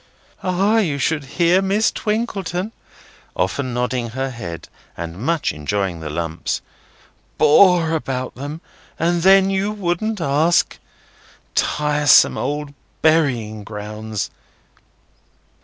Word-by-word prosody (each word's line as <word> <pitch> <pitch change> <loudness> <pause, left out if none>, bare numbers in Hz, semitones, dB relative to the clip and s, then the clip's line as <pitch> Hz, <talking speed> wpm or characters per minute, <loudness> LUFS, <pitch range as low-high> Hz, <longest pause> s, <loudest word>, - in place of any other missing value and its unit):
"Ah! 195 +4 +2
you 160 -10 0
should 145 +1 0
hear 175 +2 +4
Miss 200 +3 +2
Twinkleton," 210 -3 -2 0.6
often 125 +8 -1
nodding 125 0 -1
her 130 +3 -3
head, 85 -9 -7 0.3
and 85 0 -5
much 165 +4 0
enjoying 90 +3 -2
the 80 -1 -6
Lumps, 80 +1 -3 0.8
"bore 170 0 +5
about 135 -5 -2
them, 145 +5 -7 0.4
and 170 +1 +1
then 195 +1 +5
you 195 +2 0
wouldn't 205 +2 -2
ask. 160 +2 +2 0.7
Tiresome 150 -2 +4
old 145 0 -3 0.3
burying 125 -10 +2
grounds! 105 0 -5
150 Hz, 105 wpm, -20 LUFS, 110-180 Hz, 0.8 s, bore